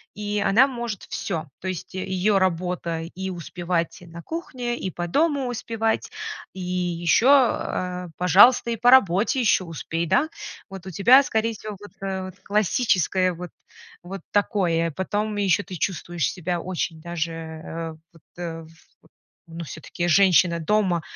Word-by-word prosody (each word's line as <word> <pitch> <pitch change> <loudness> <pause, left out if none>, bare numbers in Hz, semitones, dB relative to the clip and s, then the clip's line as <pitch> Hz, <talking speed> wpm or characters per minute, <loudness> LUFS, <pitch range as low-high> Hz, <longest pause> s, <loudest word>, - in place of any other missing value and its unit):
и 210 0 -2
она 215 +7 +5
может 235 -6 -5
всё. 165 -5 -3
То 190 - -6
есть 185 0 -5
её 190 +2 +1
работа- 175 -2 -1
и 190 +1 -4
успевать 175 -1 -3
и 175 - -13
на 170 0 -10
кухне, 250 -8 -4
и 190 - -3
по 175 -1 -4
дому 285 - +1
успевать, 225 -2 -2 0.4
и 190 - -9
ещё, 180 +3 +1 0.3
э, 180 0 -4
пожалуйста, 200 +8 +6
и 230 - -2
по 245 - +4
работе 225 0 +5
ещё 215 -6 +3
успей, 165 +1 -3
да? 275 - +3 0.4
Вот 190 -1 -9
у - - -5
тебя, 240 - +7
скорее 225 -4 0
всего, 215 -1 -8
вот, 205 0 -12
э, 190 -1 -3
классическое 200 -3 +2
вот 175 0 -8 0.5
вот 190 +1 -7
такое. 180 -5 +1
Потом 205 +5 -2
ещё 200 -2 +2
ты 185 +1 -8
чувствуешь 175 -2 -2
себя 175 -1 -3
очень 175 -3 -3
даже, 170 -1 -3
э, 165 0 -6 0.2
вот 165 - -19 0.2
э, 165 -2 -5
в - - -14 0.6
э, 165 - -25
ну, 170 +1 -5
всё-таки 165 +2 -5
женщина 175 -1 +4
дома, 185 0 +1
185 Hz, 155 wpm, -24 LUFS, 170-210 Hz, 0.6 s, тебя